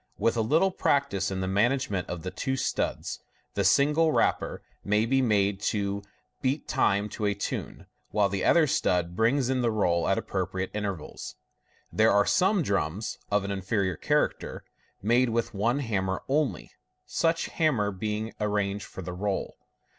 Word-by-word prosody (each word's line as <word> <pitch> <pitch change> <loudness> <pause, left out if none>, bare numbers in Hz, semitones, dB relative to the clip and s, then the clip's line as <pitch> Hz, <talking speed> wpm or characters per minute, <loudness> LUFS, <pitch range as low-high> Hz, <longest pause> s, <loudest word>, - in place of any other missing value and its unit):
With 115 - +1
a 115 - +1
little 160 - +3
practice 140 - +1
in 95 -1 -3
the 95 - -1
management 105 -2 +1
of 90 -2 -5
the 90 - -4
two 130 +7 -2
studs, - - -2 0.3
the - - 0
single 150 +3 +4
rapper - - 0 0.2
may 105 +2 +2
be 135 +3 +2
made 100 -4 +2
to 100 -1 -2 0.4
beat 135 +2 -1
time 100 +1 +2
to 105 - -4
a 100 0 +1
tune, 100 - -5 0.2
while 105 -2 +2
the 100 0 -2
other 165 -2 +5
stud 90 - 0
brings 120 +5 +2
in 130 -1 +1
the 120 - +2
roll 90 -6 +1
at - - +2
appropriate 95 0 -3
intervals. 100 -6 -5 0.6
There 110 +1 +4
are 100 0 +4
some 190 0 +3
drums 100 - -2
(of 105 -1 +2
an 100 - -3
inferior 95 -1 -1
character) - - -1 0.4
made 120 +4 +3
with 115 0 -1
one 115 +6 +1
hammer 95 -8 -1
only; 145 0 0 0.3
such 165 0 +1
hammer 130 -11 +1
being 105 +3 -3
arranged 105 -1 -1
for 95 - -9
the 90 - -5
roll. 100 +2 -2
105 Hz, 160 wpm, -27 LUFS, 100-130 Hz, 0.6 s, other